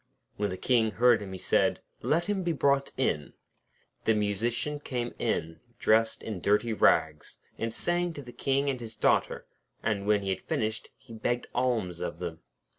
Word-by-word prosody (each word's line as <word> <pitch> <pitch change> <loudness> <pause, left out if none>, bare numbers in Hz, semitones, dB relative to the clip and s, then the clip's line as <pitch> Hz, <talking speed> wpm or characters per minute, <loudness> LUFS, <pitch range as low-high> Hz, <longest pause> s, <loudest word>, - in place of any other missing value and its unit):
When 105 0 -1
the 90 - -4
King 115 +1 +2
heard 120 -1 +4
him, 100 -2 -7
he 95 - -5
said: - - +2 0.2
'Let 170 +3 +1
him 205 -1 0
be 175 -2 0
brought 140 -2 +2
in.' 75 - 0 0.7
The 110 - +4
Musician 115 +8 -1
came 125 -4 -3
in, 80 +1 -1 0.2
dressed 110 0 +3
in 110 -4 -4
dirty 105 +4 +2
rags, 75 -7 +2 0.2
and 115 0 -1
sang 175 +7 0
to 145 - -8
the 120 -1 -11
King 140 +1 0
and 135 -2 0
his 115 -2 -6
Daughter, - - +1 0.4
and 100 -2 -1
when 105 -1 +3
he 95 - -2
had 95 -1 -1
finished, 110 +1 -2
he 130 -3 -14
begged 120 +2 -1
alms 115 -9 0
of 90 - -4
them. 85 -2 -5
115 Hz, 180 wpm, -29 LUFS, 100-130 Hz, 0.7 s, heard